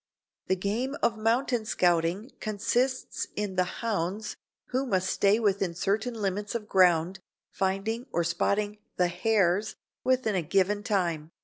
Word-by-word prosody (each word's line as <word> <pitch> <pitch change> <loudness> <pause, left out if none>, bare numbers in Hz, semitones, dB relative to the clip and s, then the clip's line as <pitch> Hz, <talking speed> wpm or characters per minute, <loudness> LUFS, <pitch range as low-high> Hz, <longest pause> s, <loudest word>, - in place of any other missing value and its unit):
The 190 - +2
game 220 +9 -2
of 230 - +3
mountain 230 +2 +1
scouting 180 +3 +1
consists 240 +5 -1
in 205 -2 -2
the 185 - +3 0.2
"hounds," 205 0 -2 0.3
who 260 +2 -1
must 190 -4 +1
stay 200 +2 +3
within 195 -5 +1
certain 215 +7 -1
limits 205 0 -2
of 215 -2 -3
ground, 180 -2 +3 0.3
finding 195 +6 -1
or 170 - +1
"spotting" 205 +4 0 0.2
the 180 -1 +3
"hares" 205 +1 +1 0.3
within 255 -4 +2
a 185 - +1
given 195 +5 +1
time. 175 -7 -1
205 Hz, 135 wpm, -28 LUFS, 185-225 Hz, 0.3 s, of